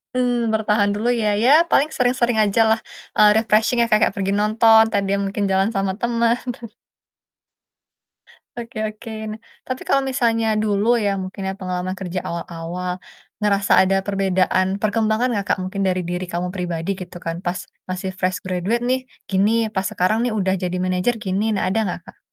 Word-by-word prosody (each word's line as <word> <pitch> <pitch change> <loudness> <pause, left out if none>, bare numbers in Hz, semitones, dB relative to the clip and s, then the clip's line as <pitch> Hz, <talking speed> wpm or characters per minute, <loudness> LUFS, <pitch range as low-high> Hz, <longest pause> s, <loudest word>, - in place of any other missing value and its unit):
Mmm, 245 -2 +1
bertahan 210 -1 +2
dulu 215 +3 -2
ya, 215 - +1 0.2
ya 245 - +4 0.2
paling 290 +3 +3
sering-sering 245 -3 +1
ajalah, 220 +2 +3 0.4
eee, 210 - +7
refreshing 220 +2 +2
ya, - - +4
ka 230 -2 +3
kayak - - +4
pergi 195 0 0
nonton, 220 +2 +5
entah 205 -2 +1
dia 195 +1 0
mungkin 200 +1 -2
jalan 190 +2 +2
sama 195 -3 -1
teman. 235 0 +2 2.2
Oke 235 -2 -7
oke. 215 +2 -11 0.2
Nah, 215 - -6 0.3
tapi 255 0 -4
kalau 275 - +3
misalnya 230 -3 +1 0.2
dulu 205 0 0 0.2
ya, 200 - +2
mungkin 185 +1 -7
ya 190 - -2
pengalaman 185 0 -3
kerja 180 -1 -3
awal-awal, 170 +1 -5 0.5
ngerasa 200 -2 +1
ada 195 +1 +1
perbedaan 190 -1 +1
perkembangan 220 +3 +1
enggak, 200 - -2
Kak, - - -2
mungkin 190 +2 -4
dari 185 0 0
diri 180 +1 -3
kamu 180 0 -3
pribadi 175 -2 -3
gitu 185 -1 -8
kan, 165 0 -2
"Pas 175 +1 -1 0.3
masih 185 +1 -3
fresh 185 0 0
graduate 185 +6 -1
nih 260 +1 +2 0.3
gini, 195 +2 +2 0.2
pas 190 -1 -1
sekarang 185 +5 +1
nih 240 - -1
udah 190 -1 +1
jadi 180 0 -2
manajer 185 +6 0
gini." 205 +3 0
Nah - - -1
ada 195 - 0
enggak, 180 - -3
Kak? - - -16
200 Hz, 170 wpm, -21 LUFS, 185-225 Hz, 2.2 s, eee